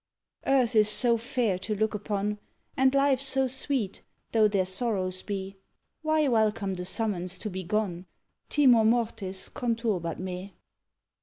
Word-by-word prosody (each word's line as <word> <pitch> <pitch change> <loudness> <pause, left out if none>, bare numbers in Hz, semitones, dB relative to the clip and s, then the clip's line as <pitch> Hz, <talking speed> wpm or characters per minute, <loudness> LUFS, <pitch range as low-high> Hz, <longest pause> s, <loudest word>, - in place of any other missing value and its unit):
Earth 255 -4 +3
is 215 -1 +5
so 235 +2 +3
fair 230 -4 -1
to 210 +3 -3
look 220 +2 0
upon, 210 0 -2 0.4
And 265 +1 +3
life 275 -2 +3
so 270 -1 +2
sweet, 260 -5 -2 0.3
though 220 -2 +5
there 200 -3 +1
sorrows 185 -2 -1
be, 195 -1 -5 0.4
Why 310 -1 +2
welcome 215 -5 +1
the 180 -1 -5
summons 190 -3 0
to 210 +2 -5
be 190 +1 -4
gone? 185 -2 -2 0.4
_Timor 255 -6 +5
mortis 220 -5 -1
conturbat 225 - -2
me. 185 +1 -6
215 Hz, 140 wpm, -28 LUFS, 190-245 Hz, 0.4 s, is